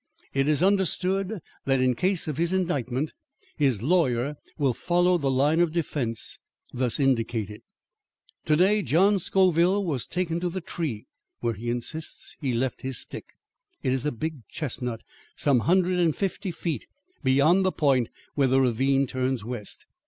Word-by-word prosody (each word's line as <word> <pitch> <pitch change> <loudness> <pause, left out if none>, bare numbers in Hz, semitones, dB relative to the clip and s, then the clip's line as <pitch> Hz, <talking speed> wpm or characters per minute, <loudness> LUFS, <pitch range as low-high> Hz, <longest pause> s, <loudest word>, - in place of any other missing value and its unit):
"It 135 +1 +1
is 155 +2 +3
understood 195 +1 +1 0.3
that 135 -1 +2
in 130 0 +3
case 180 +8 0
of 150 -3 -3
his 170 +2 +1
indictment, 145 -6 -1 0.4
his 130 -8 +1
lawyer 145 -4 +2 0.2
will 140 -5 +2
follow 175 +5 +2
the 140 -3 0
line 140 +5 +3
of 175 -2 +3
defence 140 -8 -2 0.3
thus 125 0 0
indicated." 115 -6 0 0.8
"To 155 - +3
day, 195 +6 +4
John 195 +4 +3
Scoville 185 +2 +3
was 140 -8 -2
taken 170 -2 -1
to 180 0 -1
the 185 +2 -4
tree 160 - -4 0.4
where 120 -1 0
he 115 +3 -5
insists 125 +7 -4
he 135 -3 0
left 125 +1 -1
his 130 -1 -4
stick. - - -8 0.6
It 130 - +1
is 130 -2 -1
a 150 - 0
big 145 -1 -5
chestnut 125 -6 -3 0.3
some 140 -4 +3
hundred 180 0 +3
and 165 -3 +2
fifty 195 0 -2
feet 170 -2 -4 0.4
beyond 145 +8 +4
the 185 - +2
point 135 -8 +2 0.2
where 140 -2 +2
the 130 +1 +3
ravine 135 +2 +2
turns 130 -3 -2
west. 120 -4 -7
145 Hz, 160 wpm, -26 LUFS, 125-175 Hz, 0.8 s, day